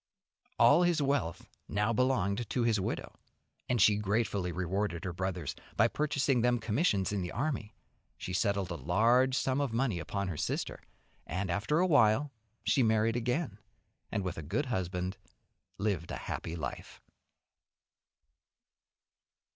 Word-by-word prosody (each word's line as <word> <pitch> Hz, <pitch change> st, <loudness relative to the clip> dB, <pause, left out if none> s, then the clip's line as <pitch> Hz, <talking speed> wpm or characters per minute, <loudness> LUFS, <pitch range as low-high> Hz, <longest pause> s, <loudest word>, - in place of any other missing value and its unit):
All 145 Hz, +8 st, +6 dB
his 175 Hz, -2 st, +3 dB
wealth 140 Hz, -, -1 dB, 0.2 s
now 105 Hz, +3 st, 0 dB
belonged 115 Hz, -3 st, +1 dB
to 125 Hz, -, 0 dB
his 115 Hz, -3 st, +2 dB
widow, 95 Hz, -, -3 dB, 0.6 s
and 125 Hz, -1 st, +2 dB
she 105 Hz, +1 st, +6 dB
gratefully 105 Hz, -3 st, 0 dB
rewarded 90 Hz, 0 st, -2 dB
her 90 Hz, -, -3 dB
brothers 90 Hz, -3 st, -3 dB, 0.2 s
by 115 Hz, -, +6 dB
purchasing 140 Hz, -3 st, +1 dB
them 120 Hz, +1 st, +3 dB
commissions 110 Hz, -, +1 dB
in 100 Hz, -2 st, -1 dB
the 90 Hz, -, -4 dB
army; 120 Hz, -4 st, -3 dB, 0.4 s
she 90 Hz, -, -5 dB
settled 100 Hz, -1 st, 0 dB
a -, -, -2 dB
large 115 Hz, -, +3 dB
sum 135 Hz, +1 st, +1 dB
of 140 Hz, -4 st, -1 dB
money 115 Hz, -5 st, 0 dB
upon 100 Hz, +5 st, -3 dB
her 85 Hz, -5 st, -4 dB
sister, -, -, -2 dB, 0.5 s
and 95 Hz, 0 st, -2 dB
after 105 Hz, -, 0 dB
a 180 Hz, -, +4 dB
while 140 Hz, -3 st, +4 dB, 0.3 s
she 135 Hz, -, +3 dB
married 110 Hz, 0 st, +3 dB
again, 120 Hz, -, -1 dB, 0.5 s
and 100 Hz, -3 st, -1 dB
with 90 Hz, -3 st, -4 dB
a -, -, -4 dB
good 100 Hz, -, -1 dB
husband 95 Hz, -4 st, -2 dB, 0.6 s
lived 100 Hz, -5 st, -1 dB
a -, -, -4 dB
happy 85 Hz, -, -5 dB
life. 80 Hz, -2 st, -6 dB
105 Hz, 145 wpm, -31 LUFS, 95-125 Hz, 0.6 s, All